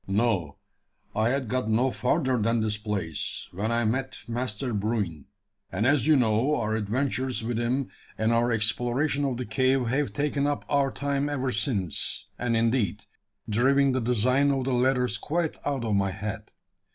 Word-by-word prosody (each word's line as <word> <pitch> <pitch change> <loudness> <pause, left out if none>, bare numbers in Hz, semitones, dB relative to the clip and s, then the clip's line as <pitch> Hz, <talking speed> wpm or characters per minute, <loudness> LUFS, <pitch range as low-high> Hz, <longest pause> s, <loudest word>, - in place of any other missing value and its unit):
"No. 95 -7 0 0.6
I 110 +2 +2
had 135 -1 -1
got 125 -1 -1
no 125 +4 +2
further 130 +1 +1
than 115 +2 +1
this 110 -1 0
place, 105 -7 -3
when 105 +5 -2
I 115 0 +1
met 130 +4 -1
Master 120 0 -3
Bruin; 100 -7 -2 0.4
and, 100 +4 0
as 145 0 +3
you 155 - +6
know, 125 +3 +2
our 110 -1 -1
adventures 125 +3 -1
with 115 0 -2
him 125 +3 0 0.3
and 110 +2 +2
our 120 +1 +2
exploration 120 +6 +1
of 130 -3 -1
the 125 - -3
cave 130 +3 +2
have 140 +3 0
taken 145 -1 0
up 145 - -2
our 140 -2 +2
time 140 +1 -1
ever 135 -3 -1
since, 100 - -1
and, 120 -2 +1
indeed, 115 -4 +1 0.4
driven 135 +5 +3
the 130 0 0
design 125 +4 +2
of 135 -2 +1
the 130 0 -1
ladders 125 0 +2
quite 165 +1 -1
out 135 -5 -1
of 110 - 0
my 100 -1 +2
head. 105 +3 -5
120 Hz, 170 wpm, -27 LUFS, 110-135 Hz, 0.6 s, you